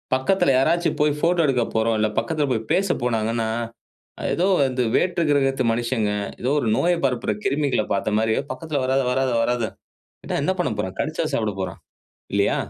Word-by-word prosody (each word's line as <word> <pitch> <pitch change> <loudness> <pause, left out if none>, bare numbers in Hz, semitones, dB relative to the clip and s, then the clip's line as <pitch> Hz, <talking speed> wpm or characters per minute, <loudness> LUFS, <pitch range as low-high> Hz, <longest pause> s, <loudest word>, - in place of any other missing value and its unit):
பக்கத்துல 135 +2 +2
யாராச்சு 165 +6 +2
போய் 150 -1 +2
ஃபோட்டோ 170 +2 +2
எடுக்க 125 -3 +2
போறோம்ல்ல 110 -1 +2
பக்கத்துல 155 -4 -1
போய் 110 -2 -2
பேச 195 +2 +2 0.2
போனாங்கன்னா, 115 -1 0 0.9
ஏதோ 180 +3 +1 0.2
வந்து 130 -1 0
வேற்று 175 -1 +1
கிரகத்து 135 -2 +2
மனிஷங்க 115 -2 0 0.3
ஏதோ 125 - 0
ஒரு 115 - -1
நோய 175 +1 +2
பரப்புற 125 -4 0
கிருமிகள 140 -6 +1
பார்த்த 105 +2 0
மாரியே 110 +2 +1
"பக்கத்துல 155 -4 -3
வராத, 135 +1 +2
வராத, 130 0 +1
வராத." 120 0 0 0.8
என்ன 185 - +1
பண்ண 175 - +1
போறோம்? 95 -2 -3
கடிச்சா - - -1
சாப்பட - - 0
போறோம். - - -4 0.6
இல்லையா? - - +2
130 Hz, 155 wpm, -23 LUFS, 115-150 Hz, 0.9 s, பக்கத்துல